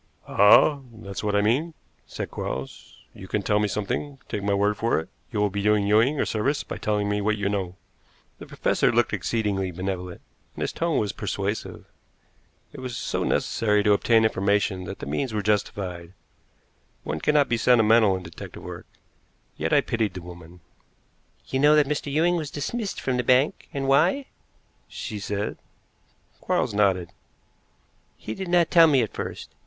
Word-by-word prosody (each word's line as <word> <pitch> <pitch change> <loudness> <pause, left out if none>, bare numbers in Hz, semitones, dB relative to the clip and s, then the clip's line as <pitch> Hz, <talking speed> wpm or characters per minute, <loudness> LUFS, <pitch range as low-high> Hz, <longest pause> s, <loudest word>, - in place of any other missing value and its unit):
"Ah, 105 +8 +6 0.2
that 100 - -9
is 100 - -5
what 105 -1 0
I 105 - +4
mean," 145 +10 0 0.3
said - - -6
Quarles. 65 0 -7
"You 95 - -11
can 105 +1 -2
tell 105 +1 +2
me 105 - +1
something. 105 +8 -3
Take 105 - -4
my 100 0 +1
word 105 +1 +1
for 115 -2 +1
it, 80 +3 -8 0.2
you 110 - -2
will 105 -1 +1
be 100 +1 -2
doing 105 0 +2
Ewing 115 +8 +3
a - - +2
service 135 +7 -1
by - - -7
telling 105 -1 0
me 105 0 0
what 110 +1 0
you 100 -1 -1
know." 95 -3 -2 0.6
The - - -10
professor - - +1
looked - - +1
exceedingly 100 -5 -1
benevolent, 90 0 -5 0.3
and - - -8
his - - -2
tone 165 -2 -1
was 105 -2 0
persuasive. 100 0 -4 0.9
It 145 - -9
was 125 -2 -5
so - - -2
necessary 105 -2 +1
to 105 -1 +4
obtain 110 +2 +3
information 100 -2 0
that - - -6
the - - -7
means 110 - -2
were 105 - -1
justified 95 -4 -2 0.9
one 75 +1 -3
cannot 150 - +3
be 120 - 0
sentimental 110 -3 +4
in 90 - -9
detective 85 -1 -10
work - - -8 0.7
yet - - -2
I - - +5
pitied 110 -5 -2
the 90 - -7
woman. 85 0 -12 0.8
"You 130 - -2
know 150 +2 +6
that 150 -2 +4
Mr. 145 0 -2
Ewing 170 +4 +2
was 155 -4 -4
dismissed 200 - -4
from 130 -2 -1
the 125 - 0
bank 130 +4 +2
and 135 -1 -3
why?" 165 - +3 0.6
she 105 - -6
said. 100 +1 -3 0.8
Quarles - - -1
nodded. 95 -4 +1 1.1
"He 110 - -6
did 190 +10 -6
not 175 -2 +3
tell 165 -1 +7
me 135 -5 +4
at 110 - -5
first. - - -6
105 Hz, 180 wpm, -25 LUFS, 100-135 Hz, 1.1 s, tell